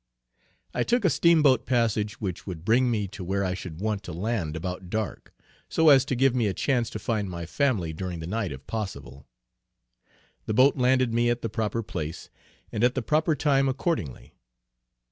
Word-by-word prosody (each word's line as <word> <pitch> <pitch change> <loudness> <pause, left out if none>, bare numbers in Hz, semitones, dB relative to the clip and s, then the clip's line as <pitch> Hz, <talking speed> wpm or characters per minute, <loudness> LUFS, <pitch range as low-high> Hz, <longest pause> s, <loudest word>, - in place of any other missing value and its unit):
I - - -1
took 240 -3 +1
a 180 - +4
Steamboat 150 -6 +4
passage 110 -4 0
which 95 -4 -5
would 85 -3 -6
bring 125 +4 +3
me 105 -4 0
to 95 -1 -8
where 100 +2 -1
I 90 - -1
should 90 -3 -7
want 105 0 -1
to 100 - -8
land 90 -3 -2
about 90 +2 -5
dark, 110 0 -4 0.4
so 160 -1 +4
as 135 -3 +6
to 130 - -1
give 135 +1 +3
me 120 -4 +1
a 95 - -2
chance 125 -1 0
to - - -5
find 105 -2 -2
my 85 -2 -5
family 100 - 0
during 90 +1 -5
the 80 - -6
night 100 +1 -2
if 65 0 -9
possible. 70 - -6 1.2
The 110 - -1
boat 135 +4 +5
landed 130 -2 +2
me 120 +1 +2
at 120 0 -1
the 115 - -1
proper 110 +1 -2
place, 80 -5 -6 0.4
and 110 - -2
at 125 +1 +3
the 130 - -1
proper 155 +4 +2
time 135 -2 +2
accordingly. 130 - -3
110 Hz, 190 wpm, -26 LUFS, 90-130 Hz, 1.2 s, as